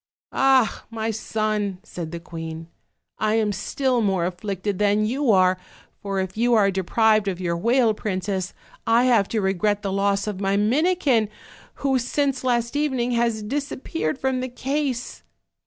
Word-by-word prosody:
"Ah! 265 -4 +3
my 225 -1 -2
son," 215 -2 -2
said 170 -6 -7
the 170 - -5
queen, 165 -1 -7 0.5
"lam 215 0 +2
still 250 +5 0
more 190 -5 +1
af 180 0 -3
flicted 200 -1 -3
than 210 +1 +3
you 260 +4 0
are; 185 -2 +4 0.4
for 195 -1 -2
if 190 -1 -3
you 235 +2 +3
are 200 -3 +4
deprived 215 +3 +2
of 185 -2 -2
your 170 -2 -1
whale 235 +5 +3
princess 190 -2 -3 0.3
I 230 +2 +4
have 235 -6 +4
to 220 - -1
regret 200 +2 0
the 195 - -2
loss 200 0 +1
of 205 -2 -4
my 195 0 +1
Minikin, 260 - +2 0.6
who 265 -1 +3
since 270 +2 -1
last 240 0 0
evening 265 -5 0
has 235 -2 0
disappeared 220 - -3
from 265 -1 -1
the 255 - -3
case." 265 0 -3
215 Hz, 155 wpm, -23 LUFS, 195-245 Hz, 0.6 s, are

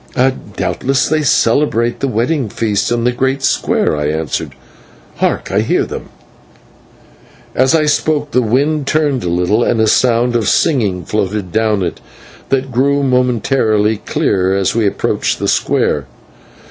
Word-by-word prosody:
"Doubtless 135 0 0
they 155 0 +1
celebrate 120 -2 +1
the 140 - -1
wedding 125 +2 -1
feast 105 +1 -1
in 120 -1 0
the 125 - +2
great 130 +2 -1
square," - - +1
I 75 0 -2
answered. 80 +1 -3 0.6
"Hark, - - -1
I - - +2
hear - - +1
them." - - -8 1.4
As 130 +5 +3
I 155 -1 +2
spoke 150 0 0
the 125 - +2
wind 140 +5 0
turned 145 -5 0
a 85 - -2
little, 90 +7 +1
and 115 - 0
a 110 - +4
sound 120 +2 +2
of 115 -4 +1
singing 105 - +1
floated 100 -3 -2
down 110 -3 +1
it, 85 - -4 0.5
that 135 0 -1
grew 140 +3 +1
momentarily 120 -4 +1
clearer 95 -2 0
as 95 -2 0
we 110 -2 +1
approached - - -1
the - - -3
square. 70 -3 0
120 Hz, 145 wpm, -15 LUFS, 105-135 Hz, 1.4 s, a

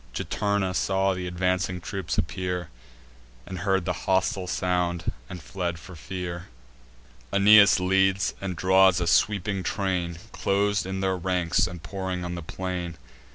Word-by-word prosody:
Juturna 100 -2 -1
saw 95 +1 +1
th' 90 - -5
advancing 90 0 -1
troops 95 -1 -4
appear, 90 0 -2 0.8
And 90 -1 -6
heard 95 -2 +1
the 90 - 0 0.2
hostile 95 0 +1
sound, 90 -2 -1 0.2
and 90 -4 -8
fled 85 +6 -3
for 90 +2 -12
fear. 90 +1 -6 0.8
Aeneas 100 0 +7
leads; 95 +1 +2
and 95 -2 -3
draws 95 +1 +4
a 85 - 0
sweeping 95 +2 +2
train, 90 -3 -2
Clos'd 100 -1 0
in 95 0 -3
their 95 -1 +1
ranks, 90 0 +1
and 90 -2 -9
pouring 95 -1 -4
on 90 - -4
the 85 - -5
plain. 90 0 -5
95 Hz, 140 wpm, -26 LUFS, 90-95 Hz, 0.8 s, Aeneas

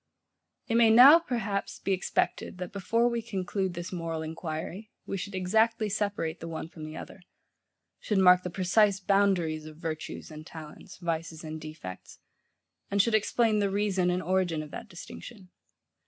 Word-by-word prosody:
It 230 - +2
may 230 -1 +6
now, 260 +8 +9
perhaps, 220 -10 -3
be 195 - -3
expected 185 0 -1
that 180 0 -6
before 225 +5 +1
we 235 -1 -1
conclude 190 -4 -3
this 175 +2 -6
moral 165 -2 -3
enquiry, 165 +5 -5 0.2
we - - -4
should 195 +1 -5
exactly 220 +4 +2
separate 200 -6 -2
the 165 - -7
one 160 0 -5
from 160 -2 -9
the 155 0 -8
other; 195 - -9 0.8
should 210 - -1
mark 180 -1 +7
the 180 - -4
precise 195 +3 +3
boundaries 185 -6 +1
of 155 -1 -11
virtues 160 -1 -6
and 155 0 -9
talents, 155 -2 -11
vices 165 -2 -4
and 155 0 -6
defects; 155 - -9 0.7
and 200 - 0
should 230 +3 +3
explain 220 0 +2
the 200 -1 +1
reason 195 -2 +1
and 180 +1 0
origin 175 -3 0
of 150 - -11
that - - -8
distinction. 185 +2 -11
185 Hz, 165 wpm, -29 LUFS, 165-205 Hz, 0.8 s, now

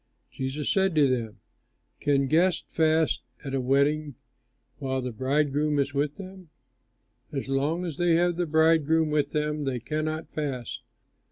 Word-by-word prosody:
Jesus 135 +3 -4
said 190 -3 +2
to 150 -2 +5
them, 115 -4 -2 0.6
"Can 140 -1 +2
guests 170 +6 +2
fast 160 -1 +2 0.2
at 135 - -4
a 135 - 0
wedding 140 +2 +1 0.6
while 130 -1 -2
the 125 -1 -3
bridegroom 145 +4 0
is 140 0 0
with 145 +1 0
them? 190 -3 -11 0.8
As 135 -2 -4
long 145 +6 0
as 160 -5 -5
they 175 -1 +3
have 175 +1 +2
the 175 0 -1
bridegroom 160 0 +3
with 150 -1 +1
them 150 0 -1
they 130 -2 -1
cannot 155 +5 -3
fast. 135 -6 -4
150 Hz, 150 wpm, -27 LUFS, 135-160 Hz, 0.8 s, to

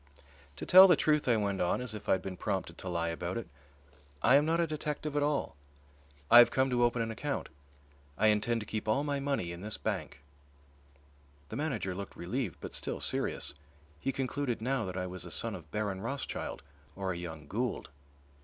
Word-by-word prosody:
"To - - -6
tell 185 +1 +10
the 175 - +6
truth," 150 -1 +2
I 120 -2 +4
went 100 -2 -1
on, 90 - +1
as 125 -3 -4
if 105 - -7
I - - +6
had 95 - 0
been 95 -1 -5
prompted 95 0 -3
to 95 - -5
lie 85 -1 -1
about 85 +4 -3
it, 115 - -5 0.8
"I 125 - +6
am 145 +2 +5
not 165 +1 +2
a 170 - +3
detective 150 -1 -3
at 145 - +2
all. 145 - 0 0.8
I 120 - +11
have 120 - +8
come 130 0 +1
to 120 -1 +3
open 120 -1 +2
an 115 - -3
account. 140 +5 -3 0.7
I 110 +2 +4
intend 110 +2 +1
to - - -6
keep 110 +1 -4
all 135 +7 +2
my 145 -1 -1
money 135 -11 -1
in 85 0 -7
this 105 +1 -2
bank." 70 - -4 1.3
The - - -6
manager 135 -9 -2
looked 100 +1 -7
relieved 95 +3 -3
but - - -7
still - - -3
serious; - - -1 0.5
he 135 - -1
concluded 135 -1 -2
now 125 +1 0
that 95 0 -5
I 90 - -1
was 90 -1 -6
a - - -7
son - - -2
of - - -9
Baron 105 -3 -2
Rothschild 130 - -4 0.3
or 95 -1 -2
a - - -5
young 80 -3 -7
Gould. 120 - -2
115 Hz, 205 wpm, -31 LUFS, 95-140 Hz, 1.3 s, I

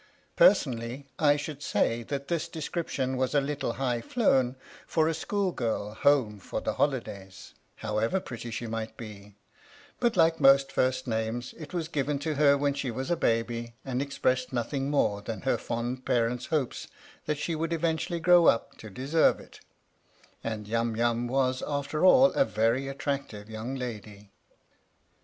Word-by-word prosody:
Personally 130 - +3
I 145 -2 +5
should 145 0 -5
say 115 -4 +1
that 140 +3 -5
this 170 -1 -1
description 155 -5 -3
was 130 +2 0
a - - +6
little 140 -3 -2
high 125 -3 -1
flown 130 - +2 0.3
fora 160 0 +2
school 195 +4 -1
girl 110 -6 -2
home 115 -5 +2
for - - -4
the - - -2
holidays, 100 -9 -3 0.2
however 110 - -1
pretty 120 -7 -7
she 120 +1 -4
might 115 0 -5
be, 105 -3 -10 0.6
but 240 -5 +1
like 165 -1 +4
most 135 -1 +5
first 130 -1 +1
names, 115 +1 -2
it 155 -3 -10
was 170 -3 -2
given 145 -2 -1
to 155 +2 -2
her 140 -1 +4
when 140 0 +1
she 140 -2 -3
was 130 +6 -4
a - - +4
baby 115 -3 -1
and 130 -1 -1
expressed 130 -2 0
nothing 135 +3 -2
more 105 -8 +1
than 110 +1 -5
her 135 - +1
fond 120 +2 -3
parents' 120 0 0
hopes 150 -6 -2 0.4
that 150 -1 0
she 165 +3 -2
would 165 +1 -2
eventually 165 +1 -1
grow 175 0 +6
up 115 - +2
to 110 - -9
deserve 135 +10 +2
it, - - -15 0.8
and 110 -2 -4
Yum 115 +1 0
Yum 120 +1 +1
was 130 0 +1
after 145 +2 -2
all 260 +9 +7
a 275 - +4
very 115 - +1
attractive 135 -6 -4
young 110 +4 -5
lady. 105 -5 -7
130 Hz, 160 wpm, -28 LUFS, 115-150 Hz, 0.8 s, all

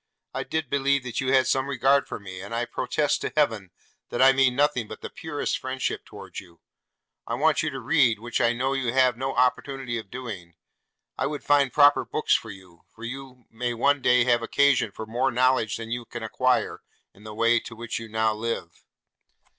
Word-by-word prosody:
I - - -2
did 160 -2 -3
believe 140 0 +1
that 120 +1 -3
you 130 0 0
had 130 -1 +4
some 130 +1 +1
regard 140 +1 +2
for - - -6
me, 95 -2 -9
and 100 +4 -6
I 120 +1 0
protest 145 +4 -1
to - - -3
heaven 110 -10 +1 0.4
that - - -4
I 130 +1 +8
mean 135 -2 +3
nothing 140 -5 +1
but - - -9
the - - -7
purest 150 -3 -3
friendship 130 0 -3
towards - - -9
you. 85 -3 -16 0.7
I - - -1
want - - +2
you - - -1
to - - -6
read, 115 -3 +3
which 120 +3 -3
I 120 -1 +4
know 130 +3 -1
you 130 -3 -1
have 130 -2 +4
now 130 +3 -3
no 135 - -3
opportunity 125 -1 0
of 110 - -11
doing. 100 -10 -8 0.6
I - - +1
would 150 0 -5
find 140 -3 +3
proper 145 +2 +5
books 155 - 0
for 115 - 0
you; 95 -4 -13
for 115 - -13
you 130 +1 -8
may 120 +1 -3
one 140 +4 +2
day 125 -1 +4
have 120 -1 +2
occasion 140 -2 +2
for 110 - -7
more 120 +4 0
knowledge 130 -3 +2
than 115 0 -7
you 120 0 -3
can 120 -1 -7
acquire 130 +3 0 0.3
in 100 - -19
the 110 -1 -9
way 115 +1 +3
to 115 - -10
which 115 0 -4
you 115 -1 -9
now 110 0 +1
live. 110 -6 -5
125 Hz, 210 wpm, -25 LUFS, 115-135 Hz, 0.7 s, I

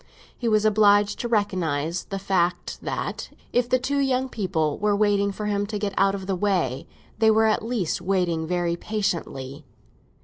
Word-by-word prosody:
He 240 - -3
was 215 -1 +3
obliged 205 -1 +4
to 240 - -2
recognise 175 -7 -1
the 195 - -5
fact 180 -2 -1
that - - -4 0.2
if 245 0 +2
the 255 - +4
two 280 +3 -1
young 265 -1 +1
people 175 - -1
were 210 0 +2
waiting 200 -1 +2
for 210 +2 -5
him 205 -1 0
to 210 0 -3
get 205 -1 -2
out 195 0 +3
of 190 -1 -6
the 190 0 -1
way, 175 -9 0 0.3
they 220 - +5
were 220 0 +4
at 215 -1 +2
least 220 -9 -2
waiting 175 -3 0
very 175 -1 0
patiently. 165 -9 -3
200 Hz, 175 wpm, -24 LUFS, 175-215 Hz, 0.3 s, they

